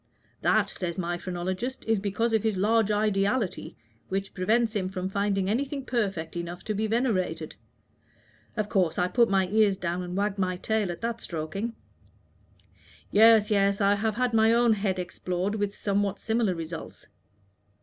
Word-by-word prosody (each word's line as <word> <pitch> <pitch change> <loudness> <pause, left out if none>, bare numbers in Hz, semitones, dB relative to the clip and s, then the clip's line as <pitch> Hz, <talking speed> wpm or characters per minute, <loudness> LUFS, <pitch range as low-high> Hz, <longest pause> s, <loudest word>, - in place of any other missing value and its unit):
'That,' - - +3
says 170 -2 -4
my 175 -1 -1
phrenologist, 185 +8 -4
'is 225 -2 +2
because 210 +4 -1
of 220 - +3
his 220 -2 0
large 215 +2 +2
ideality, 205 0 0 0.3
which 195 +1 -3
prevents 220 +4 +1
him 185 -2 -1
from 185 -1 -3
finding 195 0 0
anything 275 +5 -1
perfect 195 -11 -2
enough 175 +1 -5
to 215 - -2
be 215 +2 -1
venerated.' 185 -9 -1 1.0
Of 215 -1 0
course 180 -6 +1
I 180 - +2
put 235 +4 +3
my 190 -1 +2
ears 210 -2 +3
down 175 0 -2
and 180 +1 -5
wagged 205 0 -1
my 185 -1 0
tail 215 -1 0
at 170 - -8
that 230 0 -3
stroking." 185 +8 -4 1.4
"Yes, 220 0 +6
yes; 200 -1 +3
I 200 -1 +4
have 215 +1 -1
had 250 0 0
my 220 0 +5
own 235 0 +4
head 195 -3 -1
explored 180 +2 -3
with 205 -1 -2
somewhat 200 -1 -1
similar 220 -4 0
results. 165 0 -7
200 Hz, 160 wpm, -27 LUFS, 185-220 Hz, 1.4 s, Yes